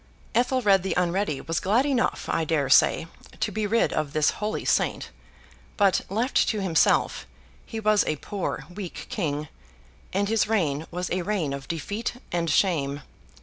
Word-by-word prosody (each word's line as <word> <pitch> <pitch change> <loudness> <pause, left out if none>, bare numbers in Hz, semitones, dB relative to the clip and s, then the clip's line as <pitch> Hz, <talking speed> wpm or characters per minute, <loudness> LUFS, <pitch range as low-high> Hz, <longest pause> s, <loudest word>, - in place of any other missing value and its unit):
Ethelred 240 -5 +3
the 190 - -2
Unready 180 -4 0
was 165 0 -2
glad 220 +8 +2
enough, 270 -4 0
I 165 - 0
dare 150 -4 0
say, 150 - +5 0.3
to 215 - 0
be 215 +1 -1
rid 230 +3 +2
of 150 -2 -2
this 155 -1 +3
holy 210 +1 -2
saint; - - 0 0.7
but, 200 -3 +3
left 230 +7 +1
to 215 - -1
himself, 180 -5 +2 0.4
he 225 - -5
was 215 -1 +3
a 155 - +1
poor 195 +6 -4
weak 190 -2 -7
king, 150 -6 -2 0.6
and 200 +2 0
his 225 0 +2
reign 160 -8 0
was 180 +1 -4
a 185 - 0
reign 175 -7 -1
of 140 0 -7
defeat 205 - -3 0.2
and 170 -1 0
shame. 145 -4 +1
190 Hz, 160 wpm, -25 LUFS, 155-210 Hz, 0.7 s, say